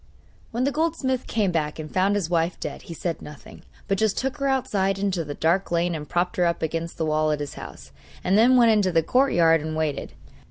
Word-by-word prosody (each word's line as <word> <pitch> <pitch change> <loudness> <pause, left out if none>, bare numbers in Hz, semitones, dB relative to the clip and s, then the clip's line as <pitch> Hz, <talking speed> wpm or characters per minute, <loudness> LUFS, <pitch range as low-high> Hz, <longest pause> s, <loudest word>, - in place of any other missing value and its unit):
When 240 +2 -2
the 280 - +1
goldsmith 300 -5 -1
came 210 -5 0
back 155 -3 -1
and 155 -1 -8
found 195 +2 +2
his 200 -5 -1
wife 170 0 0
dead - - -6
he - - -5
said 170 +1 -3
nothing, 150 -1 -12 0.3
but 195 -2 0
just 220 -2 +1
took 270 +2 -2
her 275 -1 -1
outside 215 -8 0
into 195 -3 -1
the 145 -1 -6
dark 170 +4 +1
lane 175 0 +1
and 150 -2 -6
propped 175 +1 -1
her 180 - +3
up 170 - -2
against 165 +1 -3
the 160 - -1
wall 155 0 +1
of 150 - -1
his 145 -1 -5
house, - - -10 0.3
and 185 - +2
then 245 +4 +6
went 235 -2 +6
into 205 -4 +2
the 165 -1 +2
courtyard 170 - +3
and 155 +1 -4
waited. 155 -2 -2
180 Hz, 230 wpm, -24 LUFS, 160-220 Hz, 0.3 s, then